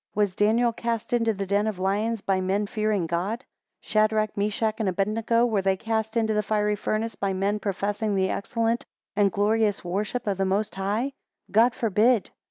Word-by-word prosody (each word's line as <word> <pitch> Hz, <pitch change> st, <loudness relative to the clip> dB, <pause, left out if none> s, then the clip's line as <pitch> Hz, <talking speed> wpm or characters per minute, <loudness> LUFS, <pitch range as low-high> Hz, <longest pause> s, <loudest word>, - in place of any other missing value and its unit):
Was 205 Hz, -3 st, +1 dB
Daniel 230 Hz, +4 st, +3 dB
cast 230 Hz, 0 st, -3 dB
into 230 Hz, -2 st, +3 dB
the 200 Hz, -2 st, -3 dB
den 200 Hz, +2 st, +1 dB
of 215 Hz, -4 st, -2 dB
lions, 205 Hz, +4 st, 0 dB
by 190 Hz, -1 st, 0 dB
men 195 Hz, +3 st, 0 dB
fearing 215 Hz, -3 st, 0 dB
God? 185 Hz, +9 st, -2 dB, 0.4 s
Shadrach, 215 Hz, 0 st, +1 dB
Meshach, 210 Hz, +2 st, 0 dB
and 215 Hz, -3 st, +1 dB
Abednego, 220 Hz, +5 st, +1 dB
were 220 Hz, -5 st, +1 dB
they 190 Hz, 0 st, +1 dB
cast 220 Hz, +1 st, -2 dB
into 220 Hz, -1 st, +2 dB
the 210 Hz, -, +2 dB
fiery 210 Hz, 0 st, 0 dB
furnace 215 Hz, +2 st, -2 dB
by 195 Hz, -1 st, -2 dB
men, 200 Hz, +3 st, 0 dB
professing 205 Hz, +1 st, -1 dB
the 190 Hz, -1 st, +1 dB
excellent 230 Hz, +2 st, -1 dB, 0.3 s
and 200 Hz, -1 st, +3 dB
glorious 210 Hz, +1 st, +1 dB
worship 210 Hz, +7 st, -2 dB
of 200 Hz, -2 st, -1 dB
the -, -, +3 dB
Most 200 Hz, +3 st, 0 dB
High? 210 Hz, +8 st, -1 dB, 0.4 s
God 230 Hz, +3 st, +4 dB
forbid. 225 Hz, -1 st, +2 dB
210 Hz, 180 wpm, -25 LUFS, 195-225 Hz, 0.4 s, God